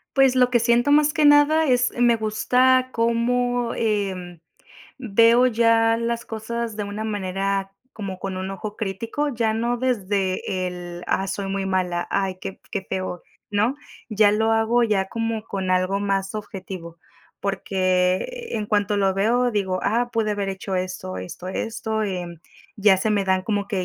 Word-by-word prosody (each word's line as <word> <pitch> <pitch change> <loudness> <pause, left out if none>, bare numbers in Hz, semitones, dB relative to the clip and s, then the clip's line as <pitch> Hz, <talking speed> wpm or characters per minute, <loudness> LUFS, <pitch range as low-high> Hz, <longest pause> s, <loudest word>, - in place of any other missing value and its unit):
Pues 270 -2 +5
lo 250 -1 +4
que 245 -1 +3
siento 235 +4 +3
más 300 0 +4
que 310 -2 +1
nada, 290 +2 +5
es 250 -3 +2
me 240 -1 +4
gusta 255 +4 +2
como, 240 +1 0
em, 190 -6 -2 0.6
veo 235 +1 +4
ya 230 -1 +3
las 235 0 -2
cosas 230 +1 -4
de 210 - -2
una 205 +2 -5
manera 195 -1 -2 0.2
como 195 -4 -6
con 190 0 -4
un 190 +1 -4
ojo 205 +2 -6
crítico. 225 +8 -2
Ya 230 -5 0
no 235 +2 0
desde 195 -6 -1
el, 175 -1 -7
ah, 195 0 0
soy 195 +1 -3
muy 195 0 -2
mala. 185 -2 -1
Ay, 190 -2 -1
qué - - -4
f - - -19
qué 200 -3 -2
feo, 185 -2 -4 0.3
¿no? 210 +6 +1 0.3
Ya 210 -2 +4
lo 220 +1 +1
hago 225 +2 +3
ya 210 -4 +1
como 225 -1 -3
con 190 -4 -3
algo 185 +2 +1
más 195 0 -1
objetivo. 190 -5 -7 0.4
Porque 190 - 0
en 215 -2 -2
cuanto 205 -1 +1
lo 195 -1 +2
veo, 240 +5 +2
digo: 190 -3 -1
"Ah, 240 +4 +1
pude 220 -2 0
haber 200 -1 -2
hecho 195 0 -4
esto, 180 - -4
esto, 95 - -8
esto", 220 +3 -3
em, 175 -5 -4 0.3
ya 200 -1 +4
se 205 +4 -1
me 205 -2 +1
dan 190 -1 +1
como 205 -1 -2
que 190 -3 -1
210 Hz, 170 wpm, -23 LUFS, 190-235 Hz, 0.6 s, Pues